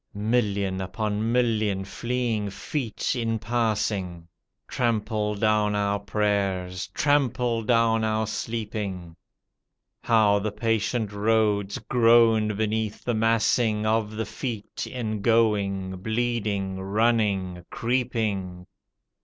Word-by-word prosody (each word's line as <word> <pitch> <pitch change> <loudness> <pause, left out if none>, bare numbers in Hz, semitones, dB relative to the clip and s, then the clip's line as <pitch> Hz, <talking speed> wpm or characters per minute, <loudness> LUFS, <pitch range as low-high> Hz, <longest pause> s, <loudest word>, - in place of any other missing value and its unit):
Million 100 -3 0
upon 105 +3 -2
million 110 -5 +1
fleeing 120 -1 -2
feet 120 +4 -3
in 115 -2 -1
passing 105 -6 -1 0.4
Trample 110 -3 -1
down 105 0 +2
our 100 0 0
prayers 100 -3 -1
— - - -36
^trample 125 -5 +1
down 115 -1 +3
our 110 0 0
sleep 110 0 -4
ing; 95 -6 -5 0.9
How 105 -3 +4
the 105 +1 -2
patient 110 0 -1
roads 105 -1 +1
groan 115 -2 +4
beneath 110 0 -2
the 120 - -1
massing 110 -1 +2
Of 110 -1 0
the 110 +1 -2
feet 115 -6 -5
in 110 -5 -4
going, 100 -4 +2
bleeding, 105 -2 -2
running, 100 -3 0
creeping! 110 -8 -2
110 Hz, 105 wpm, -25 LUFS, 100-115 Hz, 0.9 s, How